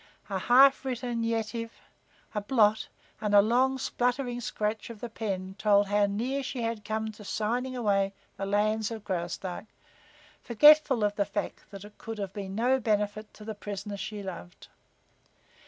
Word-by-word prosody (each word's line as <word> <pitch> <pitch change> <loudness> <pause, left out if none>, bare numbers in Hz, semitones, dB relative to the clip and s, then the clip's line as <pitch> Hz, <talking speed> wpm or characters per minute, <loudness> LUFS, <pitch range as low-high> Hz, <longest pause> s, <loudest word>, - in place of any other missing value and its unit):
A 190 - 0
half 265 +7 +6
written 245 -2 -3
Yetive, 230 0 -2 0.6
a 210 - -1
blot 215 -1 +3 0.3
and 210 -1 +1
a 200 - +9
long, 255 +4 +2
spluttering 245 -1 -1
scratch 215 0 -3
of 230 -2 -9
the 240 - -6
pen 190 -4 -4
told 205 -1 +4
how 205 0 +3
near 245 +7 -2
she 255 -2 -4
had 230 -2 -3
come 220 +1 -2
to 210 0 -13
signing 240 +6 -2
away 200 -5 +1 0.2
the 195 - -4
lands 215 +1 +1
of 225 -2 -7
Graustark, 180 0 -4 0.8
forgetful 270 0 +6
of 205 0 +1
the 200 - +2
fact 205 - -5
that 200 0 -10
it 205 0 -15
could 225 -1 -6 0.2
be 200 -1 -5
of - - -9
no 245 +6 +2
benefit 210 -1 -1
to 210 - -12
the 220 - -4
prisoner 205 0 -6
she 205 +1 -6
loved. 175 - -9
215 Hz, 165 wpm, -28 LUFS, 205-240 Hz, 0.8 s, a